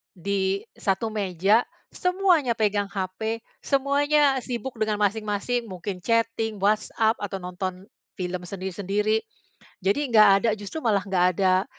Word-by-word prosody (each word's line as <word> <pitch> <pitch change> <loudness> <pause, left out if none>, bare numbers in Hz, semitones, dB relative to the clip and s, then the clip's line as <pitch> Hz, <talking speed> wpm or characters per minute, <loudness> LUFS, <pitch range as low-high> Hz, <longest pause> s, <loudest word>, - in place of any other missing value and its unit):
di 195 +1 -1 0.2
satu 195 +3 0
meja, 200 +2 +2 0.3
semuanya 360 -8 +2
pegang 205 -2 +1
HP, 205 +4 -3 0.2
semuanya 280 0 +3
sibuk 245 0 -5
dengan 215 -1 +1
masing-masing. 215 +3 0
Mungkin 185 0 -6
chatting, 230 -1 +1
WhatsApp, 215 +2 +2
atau 200 -1 -4
nonton 180 +1 -5 0.3
film 180 -2 -3
sendiri-sendiri. 200 +3 -1 0.6
Jadi 200 +8 +2
nggak 215 -2 +8
ada, 230 - 0
justru 205 +9 -7
malah 210 -3 +3
nggak 180 -2 +2
ada 185 0 +3
210 Hz, 120 wpm, -25 LUFS, 190-230 Hz, 0.6 s, nggak